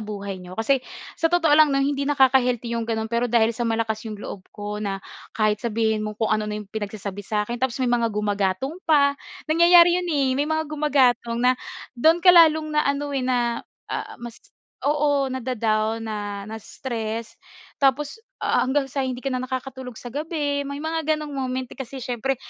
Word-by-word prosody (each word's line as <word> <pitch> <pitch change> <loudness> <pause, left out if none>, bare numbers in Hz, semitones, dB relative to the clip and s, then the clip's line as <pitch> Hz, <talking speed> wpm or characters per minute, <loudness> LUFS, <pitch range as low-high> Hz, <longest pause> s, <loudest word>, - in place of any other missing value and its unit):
buhay 200 -3 -6
niyo. 180 +1 -10
Kasi, 255 +4 +2 0.3
sa 330 - +1
totoo 330 -3 +3
lang, 305 0 +7
'no, 275 - +1
hindi 280 0 0
nakaka-healthy 255 -4 +3
'yong 230 -1 -2
gano'n 220 -1 -1
pero 240 +1 +1
dahil 230 0 +3
sa 235 0 -2
malakas 225 -1 -1
'yong 210 - -6
loob 200 -2 -8
ko 210 0 -6
na, 200 -2 -2 0.4
kahit 215 -1 +1
sabihin 220 -2 0
mong 215 0 -5
kung 220 -1 0
ano 215 0 0
na 210 - -3
'yong 210 -2 -9
pinagsasabi 205 -2 -5
sa'kin, 215 +4 -2
tapos 260 -3 0
may 240 - +1
mga 235 -1 +2
gumagatong 210 - -1
pa. 280 -2 +5 0.3
Nangyayari 345 +2 +6
'yon, 355 - -5
eh, 280 -4 +1
may 295 - 0
mga 315 0 0
gumagatong 275 -6 +2
na 255 - +6 0.4
do'n 320 +7 +4
ka 360 - +9
lalong 315 -2 +5
na 300 - +3
ano, 285 0 -1
eh, 270 - 0
na, 245 -2 0 0.3
ah, - - -4
mas 240 -1 -9 0.5
oo, 290 -1 +2
nada-down, 225 -3 -1
na 205 -2 -4
na-stress. 225 +1 -5 0.5
Tapos, 285 +8 +1 0.2
ah, - - +2
hanggang 270 +2 +1
sa 280 - -1
hindi 255 0 -4
ka 270 - -1
na 255 - -1
nakakatulog 260 -1 -6
sa 245 -1 -9
gabi, 290 -1 -2
may 280 - -5
mga 320 0 -1
gano'ng 300 -1 -6
moment, 260 -1 -2
eh, - - -8
kasi 265 +1 -6
siyempre, 255 +1 -2
250 Hz, 185 wpm, -23 LUFS, 220-285 Hz, 0.5 s, ka